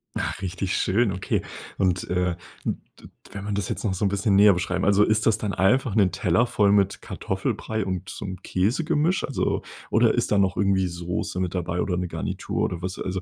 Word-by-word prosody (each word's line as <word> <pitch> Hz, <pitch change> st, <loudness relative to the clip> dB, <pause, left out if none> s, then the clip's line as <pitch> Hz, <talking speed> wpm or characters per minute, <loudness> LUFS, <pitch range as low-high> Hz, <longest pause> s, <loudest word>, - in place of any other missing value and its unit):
Ach, -, -, -3 dB
richtig 95 Hz, 0 st, -2 dB
schön, 105 Hz, +2 st, +2 dB
okay. 95 Hz, 0 st, -1 dB, 0.4 s
Und, 90 Hz, -2 st, 0 dB
äh, 90 Hz, -1 st, 0 dB, 0.3 s
d -, -, 0 dB, 0.3 s
d -, -, -12 dB, 0.2 s
wenn 100 Hz, -1 st, -6 dB
man 105 Hz, -, -3 dB
das 100 Hz, -3 st, -2 dB
jetzt -, -, -3 dB
noch 100 Hz, -4 st, 0 dB
so 100 Hz, +3 st, -1 dB
'n -, -, +4 dB
bisschen 100 Hz, +1 st, +1 dB
näher 100 Hz, +1 st, +7 dB
beschreiben 90 Hz, +1 st, -2 dB
also, 100 Hz, +1 st, +5 dB
ist 110 Hz, +1 st, +2 dB
das 110 Hz, -, +4 dB
dann 105 Hz, -2 st, -3 dB
einfach 105 Hz, +4 st, +2 dB
'n 100 Hz, -5 st, +4 dB
Teller 90 Hz, +5 st, +2 dB
voll 105 Hz, -3 st, +3 dB
mit 100 Hz, -1 st, +2 dB
Kartoffelbrei 110 Hz, -2 st, -3 dB
und 95 Hz, -1 st, -4 dB
so -, -, -6 dB
'n 95 Hz, -1 st, -6 dB
Käsegemisch? 150 Hz, -, +1 dB
Also 140 Hz, -, -1 dB, 0.3 s
oder -, -, +4 dB
ist -, -, 0 dB
da 105 Hz, -, +4 dB
noch 95 Hz, -2 st, +1 dB
irgendwie 95 Hz, -2 st, +2 dB
Soße 85 Hz, +1 st, -4 dB
mit 90 Hz, -1 st, -1 dB
dabei 90 Hz, -1 st, -2 dB
oder 90 Hz, -2 st, -1 dB
'ne 90 Hz, 0 st, -2 dB
Garnitur -, -, -3 dB
oder 85 Hz, -1 st, -2 dB
was? 95 Hz, +1 st, -4 dB
Also 95 Hz, 0 st, -3 dB
95 Hz, 215 wpm, -25 LUFS, 90-105 Hz, 0.4 s, näher